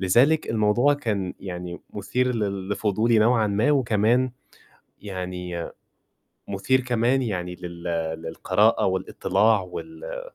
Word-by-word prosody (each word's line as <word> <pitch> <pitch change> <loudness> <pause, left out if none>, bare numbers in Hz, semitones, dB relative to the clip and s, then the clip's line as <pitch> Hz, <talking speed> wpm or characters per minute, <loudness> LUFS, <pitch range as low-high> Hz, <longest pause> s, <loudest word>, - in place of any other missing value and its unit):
لذلك 125 +12 +3
الموضوع 115 +6 +3
كان 105 -9 -2
يعني 90 -2 -6
مُثير 125 +5 -1
لل 100 -3 -2
لفضولي 110 +3 +2
نوعًا 110 0 +4
ما، 105 +8 +2
وكمان 120 -1 +2 0.7
يعني 90 -3 -5 0.8
مُثير 130 +7 +1
كمان 125 +2 +1
يعني 90 -6 -3
لل 85 -1 -9 0.4
للقراءة 80 - +2
والإطلاع 95 +3 +2
وال 165 - -7
105 Hz, 105 wpm, -24 LUFS, 95-125 Hz, 0.8 s, نوعًا